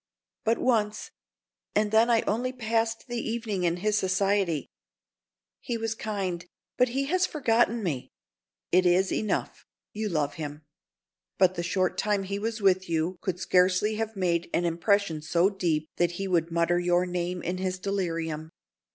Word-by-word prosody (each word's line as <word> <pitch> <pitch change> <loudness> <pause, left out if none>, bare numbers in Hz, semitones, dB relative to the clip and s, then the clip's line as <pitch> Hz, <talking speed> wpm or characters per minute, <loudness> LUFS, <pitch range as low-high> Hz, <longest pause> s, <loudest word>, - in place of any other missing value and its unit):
"But 225 +1 +3
once. 215 -4 0 0.6
And 210 0 +2
then 225 +2 +5
I 230 -1 +4
only 245 +4 -1
passed 225 -2 -1
the 240 -1 -3
evening 225 -5 -2
in 170 0 +1
his 210 +3 +1
society. 190 -4 +1 0.9
He 240 - -3
was 225 -1 -2
kind, 195 -6 -3 0.3
but 250 0 +3
he 270 +3 0
has 370 +5 +2
forgotten 235 -5 +1
me!" 145 -9 -3 0.6
"It 180 +1 +5
is 185 +2 +3
enough, 215 - -2 0.3
you 215 0 -2
love 150 -4 0
him. 150 0 -6 0.7
But 185 -1 +4
the 170 - -3
short 185 +1 0
time 205 -2 +1
he 200 +1 -3
was 225 +1 -3
with 185 -2 +3
you 165 +2 0
could 180 -2 -2
scarcely 185 +4 +2
have 225 0 -3
made 175 -3 0
an 175 - +1
impression 170 -1 +1
so 170 +5 +2
deep 165 -6 -1
that 175 0 +2
he 195 +2 -3
would 170 -3 +1
mutter 170 +1 +2
your 175 0 +2
name 180 0 -3
in 180 +2 -2
his 185 -1 -1
delirium. 165 -5 -2
190 Hz, 160 wpm, -27 LUFS, 175-220 Hz, 0.9 s, then